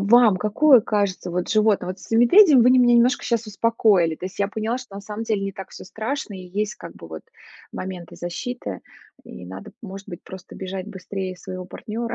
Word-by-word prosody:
вам 215 0 +5
какое 235 +6 +5
кажется, 200 -4 -1
вот, 180 +1 -2
животное? 215 -4 +2
Вот 185 +1 -5
с - - -13
с - - -15
медведем 265 - +7
вы 250 - +5
н 255 - +6
меня 240 0 +5
немножко 245 +4 +3
щас 235 -2 -1
успокоили, 205 -7 +2
то 185 - -6
есть 185 - -11
я 200 0 +1
поняла, 220 +3 -2
что 245 -6 -12
на 200 - -6
самом 210 +2 -6
деле 215 -3 0
не 195 0 -3
так 195 0 -9
всё - - -10
страшно 220 +2 -4
и 185 -1 -9
есть 210 0 -2
как 170 - -11
бы, 85 - -12
вот, 80 -1 -8 0.5
моменты 180 -3 -7
защиты, 175 - -5 0.4
и 90 - -10
надо, 95 +1 -9
может 195 -1 -9
быть, 175 - -8
просто 190 -1 -11
бежать 190 0 -6
быстрее 190 -1 -6
своего 185 0 -7
партнера. 225 +5 -5
200 Hz, 215 wpm, -23 LUFS, 185-230 Hz, 0.5 s, медведем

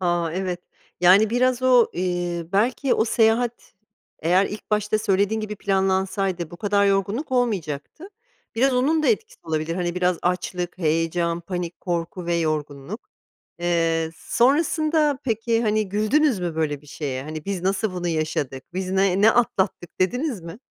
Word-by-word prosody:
A! 175 -2 0
Evet. 180 -1 -3 0.4
Yani, 195 +5 +6
biraz 255 +1 +1
o, 250 -2 +5
eee, 175 -2 -2
belki 245 +6 +2
o - - +2
seyahat 230 0 +1 0.4
eğer 180 +5 +3
ilk 210 +1 -8
başta 210 0 +1
söylediğin 205 +1 +1
gibi 210 -1 -5
planlansaydı 190 -3 0
bu 175 - -9
kadar 200 0 +2
yorgunluk 200 +8 0
olmayacaktı. 220 - -2 0.5
Biraz 260 +3 +2
onun 305 +5 +2
da - - +2
etkisi 445 -1 -1
olabilir, 160 +1 -2
hani, 175 -1 -2
biraz 180 -1 +1
açlık, 180 0 -2
heyecan, 165 +1 0
panik, 175 -1 -5
korku 175 0 -3
ve 170 - +1
yorgunluk. 155 - -3 0.5
Eee, 165 -2 +1
sonrasında 300 +2 +2
peki, 230 0 0
hani, 215 -1 +1
güldünüz 215 +6 +2
mü 170 -2 -3
böyle 150 -3 -1
bir 150 - -20
şeye? 135 -3 -4
Hani, 155 +1 -7
"Biz 195 -3 -3
nasıl 195 +1 0
bunu 175 -1 -3
yaşadık? 150 -5 -2
Biz 185 0 -3
ne 190 0 +2
ne 220 +2 +7
atlattık?" 190 -8 0
dediniz 245 - 0
mi? 170 +6 -9
190 Hz, 150 wpm, -23 LUFS, 170-225 Hz, 0.5 s, ne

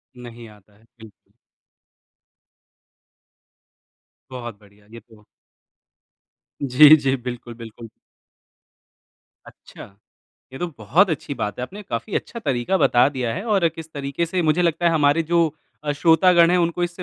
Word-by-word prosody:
नहीं 120 -1 -12
आता 105 -1 -21
है, 110 - -27 0.2
बिल्कुल। 110 -3 -18 3.0
बहुत 120 -5 -8
बढ़िया 105 0 -23
ये 115 - -10
तो। 110 -1 -22 1.4
जी, 145 +3 +7
जी। 135 -2 -1
बिल्कुल, 120 -1 -8
बिल्कुल। 115 0 -11 1.6
अच्छा। 95 - -15 0.6
ये 135 - -9
तो 175 - -2
बहुत 150 - +2
अच्छी 145 -2 -4
बात 105 -6 -5
है - - -4
आपने 195 +11 -8
काफ़ी 205 +1 -6
अच्छा 235 - -6
तरीक़ा 135 - -1
बता 120 -4 +3
दिया 130 -5 -4
है 190 - -5
और 195 -6 +2
किस 160 0 -12
तरीक़े 140 +4 -3
से 180 +2 -2
मुझे 160 +2 +1
लगता 170 0 0
है 170 - +3
हमारे 150 0 +2
जो 170 0 +1 0.4
अ, 145 - -1
श्रोतागण 170 +3 +4
हैं 180 - +2
उनको 170 0 -1
इससे 175 +1 -4
145 Hz, 140 wpm, -21 LUFS, 120-170 Hz, 3.0 s, जी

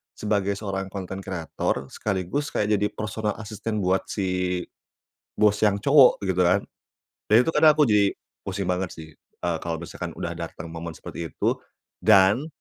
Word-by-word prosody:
sebagai 100 -2 0
seorang 95 -2 -4
konten 95 -1 -5
kreator 80 -6 -3
sekaligus 105 +8 -2
kayak 105 0 +2
jadi 105 - +2
personal 105 0 -3
asisten 110 0 -4
buat 95 +1 +1
si 90 -2 -1 0.7
bos 105 -1 +4
yang 100 -1 +3
cowok 140 -4 +6
gitu 95 -1 +1
kan. 95 +3 +3 0.7
Dan 115 +4 +6
itu 165 - 0
kadang 155 -1 +7
aku 150 - +5
jadi 105 -2 +3 0.3
pusing 95 0 -3
banget 90 0 -1
sih. 80 -1 -10 0.4
eee, 85 -2 0
kalau 85 -1 -3
misalkan 85 - -6
udah - - -3
datang 85 - -7
momen 85 0 -6
seperti 85 -2 -7
itu, - - 0 0.5
dan 105 +6 +5
100 Hz, 155 wpm, -25 LUFS, 90-105 Hz, 0.7 s, kadang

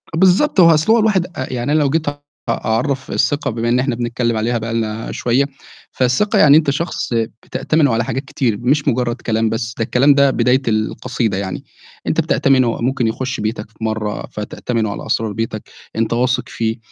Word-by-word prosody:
بالضبط، 190 - +3
هو 170 -2 +8
أصل 160 +7 +2
هو 235 - +4
الواحد 210 -5 +2
أ 130 -8 -6
يعني 125 +3 -2
أنا 155 - +3
لو 145 -2 +2
جيت 160 +2 -1
أ 145 0 -9 0.3
أعرّف 125 +4 -1
الثقة 145 -2 0
بما 115 +1 -2
إن 125 +1 +3
إحنا 130 -1 0
بنتكلِّم 120 -1 -1
عليها 115 +2 0
بقى 115 0 -4
لنا 110 -1 -3
شوية، 125 +3 +1 0.5
فالثقة 130 +11 +1
يعني 145 0 +7
أنت 155 -3 +2
شخص 150 -2 -2
بتأتمنه 120 +5 0
على 115 +1 +1
حاجات 135 +5 -3
كتير 120 -6 -1
مش 135 +6 0
مُجرّد 120 -2 +1
كلام 115 -2 -1
بس، 115 0 -3
ده 115 - 0
الكلام 135 +5 +4
ده 140 -1 +4
بداية 125 +2 +2
القصيدة 110 0 -1
يعني، 95 -1 -4 0.4
أنت - - +2
بتأتمنه 130 -4 +2
ممكن 125 -1 0
يخُش 130 +5 -3
بيتك 110 0 -3
في 110 - -12
مرّة 110 -1 -3
فتأتمنه 110 +1 -3
على - - -6
أسرار 110 -1 -1
بيتك، 110 0 -4 0.3
أنت 115 +1 0
واثق 125 +1 0
فيه، 110 -1 -2
120 Hz, 190 wpm, -18 LUFS, 115-140 Hz, 0.5 s, هو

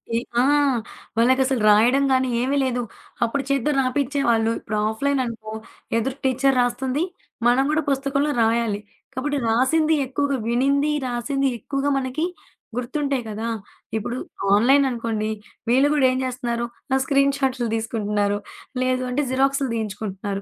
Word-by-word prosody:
ఈ - - +3 0.2
ఆ! - - +4 0.7
వాళ్ళకసలు 260 +1 +3
రాయడంగానీ 260 +5 +4
ఏమీ 270 +3 +1
లేదు. 250 -2 0 0.4
అప్పుడు 270 +4 0
చేత్తో 275 +1 +1
రాపిచేవాాళ్ళు. 255 -4 +1
ఇప్పుడు 215 - -4
ఆఫ్‌లైన్ 275 +5 0
అనుకో 225 -2 -7 0.5
ఎదురు 255 +3 -1
టీచరు 265 +1 +2
రాస్తుంది. 260 +4 0 0.4
మనం 245 +2 +4
కూడా 310 +1 +2
పుస్తకంలో 275 +2 0
రాయాలి. 225 -2 +1 0.3
కాబట్టి 290 +3 -1
రాసింది 305 +7 +3
ఎక్కువగా 280 +1 -1
వినింది 280 +5 +2 0.2
రాసింది 270 +3 -1
ఎక్కువగా 275 +4 -1
మనకి 270 +4 -1 0.5
గుర్తుంటాయి 275 +1 -1
కదా! 215 +2 -4 0.5
ఇప్పుడు 235 +3 -3 0.4
ఆన్‌లైన్ 260 +7 +5
అనుకోండి, 230 -3 -2 0.4
వీళ్ళు 265 +4 +5
గూడా 290 -3 +3
ఏం 255 - -1
జేస్తున్నారు? 240 -2 -2 0.3
ఆ - - +5
స్క్రీన్ 275 0 +3
షాట్లు 260 -3 0
తీసుకుంటున్నారు. 210 -2 -1 0.5
లేదు 255 0 +1
అంటే 255 +4 0
జిరాక్సులు 270 +1 +1
తీయించుకుంటున్నారు. 200 -2 -4
255 Hz, 125 wpm, -23 LUFS, 230-275 Hz, 0.7 s, ఆన్‌లైన్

